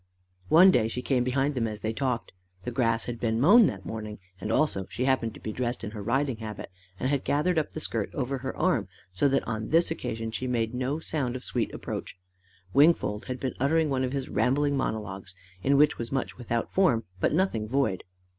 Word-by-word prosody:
One 180 Hz, +4 st, +8 dB
day 115 Hz, -9 st, +3 dB
she 125 Hz, +2 st, -4 dB
came 130 Hz, -3 st, +1 dB
behind 135 Hz, +3 st, +1 dB
them 120 Hz, -4 st, 0 dB
as 105 Hz, -1 st, -6 dB
they 110 Hz, +1 st, -2 dB
talked. 125 Hz, -1 st, -2 dB, 0.3 s
The 125 Hz, -, -4 dB
grass 115 Hz, -2 st, +1 dB
had 120 Hz, -1 st, -5 dB
been 115 Hz, -1 st, 0 dB
mown 205 Hz, -, +7 dB
that 95 Hz, -2 st, -5 dB
morning, 110 Hz, -1 st, -5 dB, 0.2 s
and 105 Hz, +4 st, -3 dB
also 110 Hz, -8 st, +1 dB
she 125 Hz, -, -2 dB
happened 125 Hz, -4 st, +1 dB
to -, -, -11 dB
be 110 Hz, -, -5 dB
dressed 120 Hz, +1 st, -3 dB
in 105 Hz, -, -4 dB
her 105 Hz, -1 st, -7 dB
riding 130 Hz, +3 st, 0 dB
habit 110 Hz, -3 st, -7 dB, 0.3 s
and 130 Hz, -, 0 dB
had 140 Hz, -1 st, 0 dB
gathered 160 Hz, +4 st, +2 dB
up 155 Hz, -, -4 dB
the -, -, -4 dB
skirt -, -, -2 dB
over 135 Hz, -1 st, -2 dB
her 130 Hz, +1 st, -5 dB
arm, 155 Hz, -, +1 dB, 0.3 s
so 95 Hz, +10 st, +2 dB
that 135 Hz, 0 st, 0 dB
on 110 Hz, -1 st, -3 dB
this 165 Hz, +1 st, +3 dB
occasion 115 Hz, -8 st, -3 dB
she 130 Hz, +3 st, -3 dB
made 115 Hz, -2 st, 0 dB
no 130 Hz, +4 st, -1 dB
sound 140 Hz, -6 st, -2 dB
of 130 Hz, -, -6 dB
sweet -, -, -2 dB
approach. -, -, -6 dB, 0.6 s
Wingfold 140 Hz, -7 st, +3 dB
had 130 Hz, 0 st, -4 dB
been 130 Hz, -1 st, -2 dB
uttering 155 Hz, +3 st, +2 dB
one 130 Hz, -1 st, +1 dB
of 125 Hz, -, -1 dB
his 135 Hz, -1 st, -3 dB
rambling 140 Hz, +6 st, +1 dB
monologues 100 Hz, -7 st, -4 dB, 0.3 s
in 140 Hz, +7 st, +3 dB
which 150 Hz, +1 st, +4 dB
was 115 Hz, -, -4 dB
much 135 Hz, -2 st, -2 dB
without 120 Hz, -1 st, -3 dB
form, 150 Hz, -13 st, +3 dB, 0.2 s
but -, -, +2 dB
nothing 150 Hz, -, 0 dB
void. 115 Hz, -6 st, 0 dB
125 Hz, 215 wpm, -27 LUFS, 110-140 Hz, 0.6 s, One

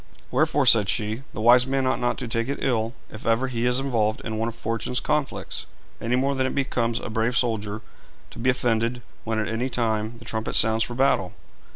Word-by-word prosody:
'Wherefore,' -, -, +2 dB
said 105 Hz, -4 st, +5 dB
she, 110 Hz, +2 st, -1 dB
'the -, -, -6 dB
wise 120 Hz, +3 st, +6 dB
man 135 Hz, 0 st, 0 dB
ought 130 Hz, -, +1 dB
not 120 Hz, 0 st, 0 dB
to 125 Hz, -, -5 dB
take 115 Hz, +1 st, -1 dB
it 140 Hz, -, -3 dB
ill, 115 Hz, -2 st, 0 dB, 0.2 s
if 110 Hz, -, -8 dB
ever 115 Hz, +3 st, +2 dB
he 120 Hz, -1 st, -1 dB
is 125 Hz, +1 st, +3 dB
involved 115 Hz, -5 st, 0 dB
in 110 Hz, -1 st, -4 dB
one 115 Hz, -, 0 dB
of 115 Hz, -, -8 dB
fortune's 115 Hz, +2 st, 0 dB
conflicts, 150 Hz, -2 st, -2 dB, 0.3 s
any 115 Hz, +2 st, 0 dB
more 135 Hz, +2 st, +1 dB
than 130 Hz, -1 st, 0 dB
it -, -, -4 dB
becomes 120 Hz, -4 st, 0 dB
a -, -, -6 dB
brave 115 Hz, +3 st, 0 dB
soldier 110 Hz, -4 st, -1 dB, 0.5 s
to -, -, -11 dB
be 125 Hz, +3 st, +1 dB
offended 120 Hz, -1 st, 0 dB, 0.2 s
when 110 Hz, 0 st, -1 dB
at 110 Hz, -1 st, -1 dB
any 115 Hz, +4 st, -2 dB
time 110 Hz, -2 st, -1 dB
the 115 Hz, -, -13 dB
trumpet 110 Hz, -1 st, -3 dB
sounds 110 Hz, 0 st, +4 dB
for 120 Hz, -, -5 dB
battle. 125 Hz, -8 st, +2 dB
115 Hz, 215 wpm, -24 LUFS, 110-125 Hz, 0.5 s, wise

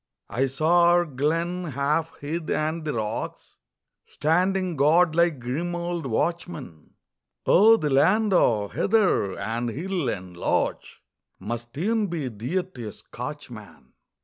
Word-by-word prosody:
I 135 Hz, +3 st, +1 dB
saw 160 Hz, +6 st, +3 dB
our 175 Hz, 0 st, +4 dB
glen, 165 Hz, +5 st, -1 dB
half 150 Hz, +2 st, -1 dB
hid, 160 Hz, +3 st, -4 dB
and 155 Hz, +2 st, -1 dB
the 150 Hz, -3 st, -3 dB
rocks 110 Hz, -1 st, -4 dB, 0.5 s
Standing 180 Hz, +3 st, +1 dB
guard 155 Hz, +4 st, +4 dB
like 170 Hz, -2 st, +2 dB
grim 150 Hz, +9 st, -3 dB
old 175 Hz, -3 st, -3 dB
watchmen. 150 Hz, -, -3 dB, 0.5 s
Oh, 220 Hz, +4 st, +6 dB
the 150 Hz, -8 st, -1 dB
land 195 Hz, +10 st, +3 dB
o' 105 Hz, -, +3 dB
heather 190 Hz, -, +1 dB
and 120 Hz, +2 st, -2 dB
hill 170 Hz, -, -2 dB
and 90 Hz, -3 st, -6 dB
loch 85 Hz, -, 0 dB, 0.6 s
Must 120 Hz, +5 st, -6 dB
e'en 215 Hz, +5 st, +1 dB
be 160 Hz, -7 st, -3 dB
dear 125 Hz, -, -2 dB
to 125 Hz, -12 st, -9 dB
a -, -, -5 dB
Scotchman. -, -, -10 dB
155 Hz, 130 wpm, -25 LUFS, 125-175 Hz, 0.6 s, Oh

